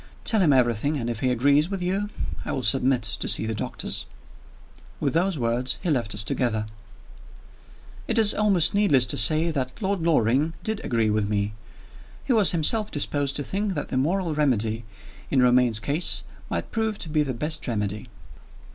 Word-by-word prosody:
Tell 220 -3 +2
him 165 -5 +4
everything, 130 +3 +1
and 120 -2 -3
if 115 - -5
he 130 - 0
agrees 140 +6 +2
with 195 -1 -3
you, 195 +3 -2 0.3
I - - -4
will 135 -3 -3
submit 130 -2 +3
to 115 - -2
see - - +2
the 110 - -2
doctors." 110 - -4 0.9
With - - -1
those 175 +1 +1
words 120 +1 -1
he 175 - 0
left 120 -7 -1
us 105 - 0
together. 110 -1 -1 1.4
It - - 0
is 215 -2 +6
almost 200 -6 +3
needless 195 -12 +4
to - - -1
say 155 +10 +2
that 130 -4 -4
Lord 195 -3 -1
Loring 150 0 +1
did 220 -1 -3
agree 115 -3 0
with 105 -1 0
me. 105 0 -1 0.7
He 265 - 0
was 215 -5 +5
himself 205 +6 +1
disposed 145 -1 -1
to 145 - -1
think 195 +4 -2
that - - -4
the - - -2
moral 170 +5 0
remedy, 115 -6 0 0.4
in 135 - +1
Romayne's 125 -3 +3
case, 145 +8 -1 0.3
might - - -4
prove 220 -2 -1
to - - 0
be 155 0 +1
the 135 -4 -2
best 155 +5 -3
remedy. 105 0 -3
140 Hz, 180 wpm, -24 LUFS, 120-175 Hz, 1.4 s, is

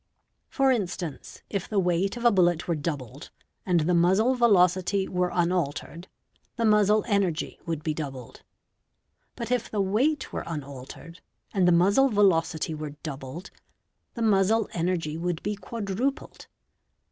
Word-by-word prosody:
Jor 270 -1 +2
instance, 180 - -4
if 200 -3 -4
the 215 - -2
weight 185 +3 +1
of 240 - -5
a 240 - +7
bullet 175 -4 +2
were 170 - +1
doubled, 145 -4 -5 0.4
and 175 -3 +3
the 175 +4 +1
muzzle 190 +9 +3
velocity 190 -4 +3
were 180 0 0
unaltered, 170 -1 -2 0.5
the 230 - 0
muzzle 210 0 +4
energy 195 -6 -1
would 160 -2 -3
be 155 - -1
doubled; 135 -6 -7 0.9
but, 235 0 -5
if 245 -2 0
the 210 - -3
weight 240 +10 0
were - - -3
unaltered 145 +2 -8 0.3
and 185 -3 +3
the - - +5
muzzle 200 +11 +4
velocity 170 -7 +2
were 150 -1 -6
doubled, 145 +3 -7 0.6
the 235 - -2
muzzle 215 +1 +3
energy 165 -2 -2
would 175 -1 -3
be 210 0 -2
quadrupled. 220 +5 -4
180 Hz, 140 wpm, -26 LUFS, 165-210 Hz, 0.9 s, a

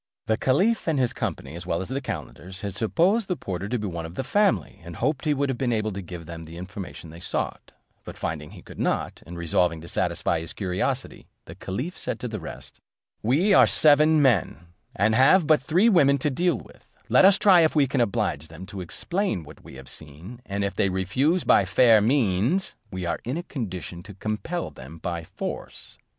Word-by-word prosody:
The 110 - +2
caliph 185 - +1
and 160 -3 +1
his 125 -3 +1
company, - - -4
as 85 +1 -8
well 85 -2 0
as 95 - -4
the 135 +1 -3
calenders, 95 - -6
had 100 -2 -3
supposed 180 - +2
the 180 - 0
porter 95 - -5
to 125 - 0
be 105 - -4
one 85 -3 -5
of 85 - -12
the 135 - -2
family, 135 - +1
and 85 -1 -9
hoped 135 +2 -1
he 150 - +3
would 140 +1 0
have 130 -3 -3
been 125 -2 0
able 110 -1 0
to 100 0 -5
give 85 -2 -8
them 80 0 -8
the 80 +1 -10
information 90 -3 -8
they 85 - -11
sought; - - -3 0.3
but - - -9
finding 75 -2 -4
he - - -13
could - - -12
not, - - -1
and 85 +1 -8
resolving 85 0 +1
to 85 - -10
satisfy - - 0
his 80 0 -7
curiosity, 95 -2 -3 0.2
the 80 - -9
caliph 105 - -5
said - - -4
to 125 - -4
the 110 -2 -5
rest, 65 -5 -9 0.4
"We 155 - +3
are - - +7
seven 155 0 +5
men, 95 - +1 0.3
and 110 -2 +2
have 135 +9 +5
but 155 0 +4
three 175 +10 +3
women 145 -10 +5
to 145 +2 -1
deal 175 +4 +1
with; - - -17
let - - +5
us 195 0 +7
try 190 -3 +6
if 160 -1 +2
we 145 -2 +5
can 135 -1 0
oblige 80 -8 -1
them 80 +4 -10
to 100 -1 -7
explain 170 - -2
what 75 - -14
we - - -12
have 65 -1 -11
seen, 80 - -10
and 100 0 -2
if 100 -2 -1
they 100 +1 +1
refuse 130 - +1
by - - +5
fair 110 +3 +5
means, 120 - +1
we 95 -3 -5
are 85 -1 -1
in 130 +6 -3
a 175 - -4
condition 95 - -6
to 100 +2 -12
compel 110 - -3
them 70 +5 -11
by 85 0 -4
force." - - -7
105 Hz, 215 wpm, -25 LUFS, 85-145 Hz, 0.4 s, are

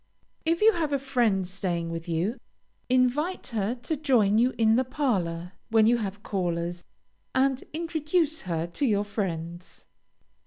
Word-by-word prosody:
If 335 +5 +1
you 445 +1 +7
have 320 -5 -1
a - - +3
friend 240 -8 +1
staying 175 -3 -2
with 165 +1 -5
you, 175 +9 -1 0.5
invite 255 +9 +1
her 220 0 -1
to 255 +6 -3
join 240 -8 +3
you 250 +2 +4
in 225 -1 +4
the 255 - +3
parlor 185 - -1 0.2
when 220 -1 +5
you 240 +2 +4
have 205 -2 -5
callers, 175 -2 -2 0.5
and 265 0 +2
introduce 320 0 0
her 165 -3 -2
to 170 +11 -2
your 205 -2 +2
friends. 175 -4 -5
220 Hz, 150 wpm, -27 LUFS, 180-275 Hz, 0.5 s, you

